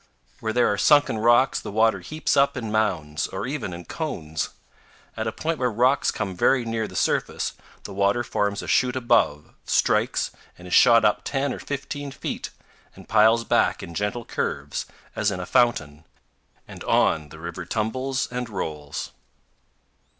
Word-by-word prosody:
Where 110 - -2
there 120 +1 +3
are 105 - -3
sunken 145 -6 +4
rocks 120 +4 +4
the - - -7
water 110 +2 +3
heaps 155 +1 -2
up 140 -1 +3
in 115 -4 -4
mounds, 80 -9 0
or 95 +3 -5
even 130 -7 -3
in 85 0 -8
cones. 80 - -4 0.7
At 110 0 -3
a - - 0
point 160 +7 -3
where 125 -1 +2
rocks 125 +5 +3
come 95 -2 -3
very 125 +7 +3
near 115 -1 -2
the - - -12
surface, - - 0 0.3
the 100 - -8
water 100 +4 +2
forms 100 -3 -1
a - - -8
chute 125 -1 +2
above, 115 - +1
strikes, - - +1 0.3
and 90 - -12
is 90 - -5
shot 115 -2 +7
up 105 - +3
10 140 -1 -1
or - - -7
15 145 0 -5
feet, - - -5 0.5
and - - -14
piles 110 +2 +4
back - - +1
in 85 - -8
gentle 105 +6 -2
curves, - - -3 0.3
as 105 - +1
in 95 -3 -3
a 90 - -4
fountain; 80 -11 +1 0.6
and - - -10
on 75 -2 +2
the 80 - -12
river 85 +2 -6
tumbles 130 +8 -2
and 125 -1 -4
rolls. 75 -7 -5
110 Hz, 170 wpm, -24 LUFS, 90-125 Hz, 0.7 s, shot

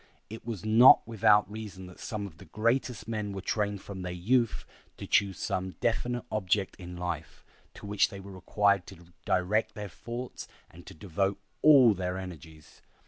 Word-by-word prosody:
It 110 - -8
was 110 -4 -5
not 115 +4 +7
without 105 -2 +4
reason 105 -3 -8
that 90 -1 -13
some 105 -4 -4
of 85 -4 -11
the - - -12
greatest 115 +2 -1
of - - -25
men 105 -3 -3
were 95 - -5
trained 105 0 -2
from 95 -2 -7
their 90 -1 -4
youth 110 +4 0 0.3
to - - -7
choose 100 -2 +2
some 95 0 -3
definite 120 +1 -1
object 100 -2 0
in 90 -1 -9
life, 85 -3 -5 0.3
to - - -11
which 100 0 +2
they 100 - -9
were 100 +1 -10
required 100 +1 +1
to 85 +1 -14
direct 105 +4 +1
their 105 -1 -6
thoughts 120 +4 -7 0.2
and 85 +1 -15
to - - -10
devote 95 +4 -1 0.2
all 135 -7 +7
their 90 -1 -3
energies. 80 -4 -10
100 Hz, 180 wpm, -29 LUFS, 90-110 Hz, 0.3 s, not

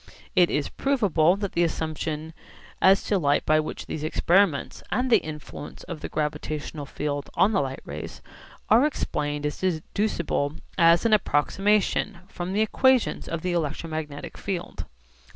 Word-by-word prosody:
It 180 -2 +5
is 145 - 0
provable 195 - +2
that 200 -1 -3
the 170 - +2
assumption 160 -1 -3 0.5
as 195 +1 +5
to 200 - +1
light 145 -3 +2
by 155 0 +4
which 155 - -4
these 155 - -5
experiments 170 0 +2
and 250 0 0
the - - +7
influence 150 -1 -8
of 170 -3 -7
the - - -5
gravitational 150 -1 -3
field 145 0 -3
on 205 - +4
the 195 - +2
light 135 -1 -4
rays 75 +2 -7 0.5
are 225 +5 +6
explained 150 - -1
is 150 - -3
deducible 170 -4 -1 0.2
as 170 +1 +5
an 225 - +4
approximation 200 +2 +2
from 175 +1 -5
the 210 - +2
equations 255 +3 +2
of 165 -1 -3
the 180 - 0
electromagnetic 155 -2 -4
field. 185 -3 -4
165 Hz, 150 wpm, -25 LUFS, 150-195 Hz, 0.5 s, the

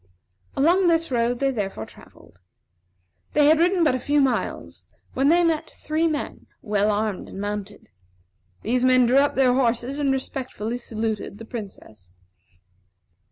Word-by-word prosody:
Along 350 +6 +3
this 330 -3 +2
road 240 0 +1
they 275 +2 +1
therefore 195 - -4
travelled. 90 - -18 0.9
They 295 -1 +4
had 310 +2 +5
ridden 355 +1 +3
but 300 - +3
a 255 - -1
few 290 +3 +1
miles 265 -3 -2 0.3
when 270 +2 +2
they 345 +2 +4
met 325 -2 0
three 315 +2 -1
men, 305 -2 -4 0.2
well 210 -1 +1
armed 210 -1 -2
and - - -9
mounted. 205 0 -5 0.8
These 245 +3 0
men 255 -1 +5
drew 250 +3 +3
up 285 +1 +1
their 260 -2 +4
horses, 250 +2 0
and 280 -2 +1
respectfully 255 -3 -4
saluted 220 -3 -4
the 225 - -10
Princess. 195 - -10
255 Hz, 150 wpm, -23 LUFS, 215-290 Hz, 0.9 s, had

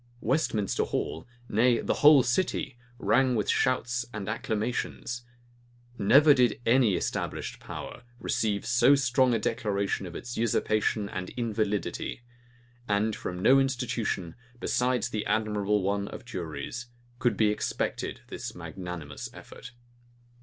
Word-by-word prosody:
Westminster 110 - +1
Hall, 80 - -3 0.2
nay, 115 +2 +3
the - - 0
whole 145 -3 +8
city, 120 +2 0 0.2
rang 130 0 +3
with 105 -3 0
shouts 125 -2 +1
and 105 -4 -5
acclamations. 115 +2 -3 0.7
Never 140 +8 +6
did 125 -4 +2
any 115 -4 +4
established - - -3
power - - -8 0.2
receive 105 -4 -1
so 125 +4 +5
strong 130 -2 +3
a - - +3
declaration 100 -3 -1
of 85 - -9
its 120 0 -6
usurpation 110 -2 +1
and 95 -2 -5
invalidity; 110 0 -2 0.6
and 105 +1 +1
from 90 +1 -5
no 135 +1 +7
institution, 120 -9 -1 0.3
besides 125 0 +1
the 110 -3 -2
admirable 105 -2 +1
one 100 +1 0
of - - -9
juries, 115 +4 -5 0.3
could 120 -4 +1
be 110 -1 +4
expected 105 - -2
this - - -6
magnanimous 90 -5 -7
effort. 125 - -11
115 Hz, 125 wpm, -28 LUFS, 100-125 Hz, 0.7 s, whole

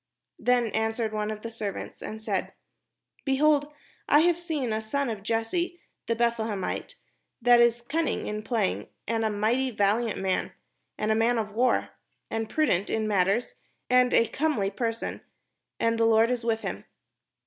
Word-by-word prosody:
Then 245 -2 +2
answered 220 0 -1
one 210 0 -1
of 215 -1 -5
the 230 - -5
servants, 215 -3 -5
and 220 - -6
said: 220 - -2 0.7
"Behold, 290 +1 +3 0.4
I 295 - +7
have 345 0 +3
seen 300 -9 -2
a 220 - -1
son 250 +4 -1
of 215 -3 -5
Jesse 235 - -1 0.3
the 230 - +1
Beth 235 0 +1
lehemite, 220 - -3 0.4
that 240 0 +6
is 235 0 +3
cimning 315 +6 -1
in 210 0 -3
playing, 220 -3 -1 0.2
and 225 0 0
a 220 - +2
mighty 225 +6 +1
vahant 210 +2 +1
man, 190 -1 -1 0.4
and 215 +1 0
a - - +3
man 230 +2 +2
of 215 -2 -2
war, 245 +4 +2 0.4
and 225 -1 -2
prudent 210 - +1
in 220 -1 0
matters, 200 +3 +1 0.4
and 250 0 +5
a 230 - +4
comely 255 -10 0
person, 230 +2 -3 0.6
and 230 0 +1
the 225 - +4
Lord 225 +1 +4
is 245 -2 -1
with 225 -1 0
him." - - -5
230 Hz, 165 wpm, -27 LUFS, 215-250 Hz, 0.7 s, I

